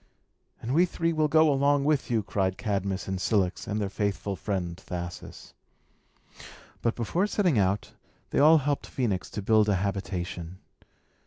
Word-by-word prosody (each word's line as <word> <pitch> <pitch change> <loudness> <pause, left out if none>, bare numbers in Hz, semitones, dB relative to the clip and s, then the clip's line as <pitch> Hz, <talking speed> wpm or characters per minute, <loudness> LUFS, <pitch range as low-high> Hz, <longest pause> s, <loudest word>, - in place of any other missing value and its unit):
"And 120 +3 -2
we 175 +4 +4
three 165 -1 -1
will 155 -1 +2
go 155 0 +4
along 140 +1 +2
with 150 -2 +1
you!" 115 -3 +1
cried 95 -1 -1
Cadmus 100 -2 -2
and 95 -1 -3
Cilix, 95 -2 0
and 105 +1 -2
their 100 - -1
faithful 100 -1 -2
friend 90 -4 -3
Thasus. 90 -1 -8 1.3
But, 115 - 0
before 170 - 0
setting 180 - +2
out, 95 +1 0 0.4
they - - +1
all 155 +3 +7
helped 145 -1 -1
Phœnix 110 -8 -2
to 105 - -5
build 110 0 +4
a 100 - +3
habitation. 95 -2 -4
105 Hz, 155 wpm, -27 LUFS, 95-145 Hz, 1.3 s, all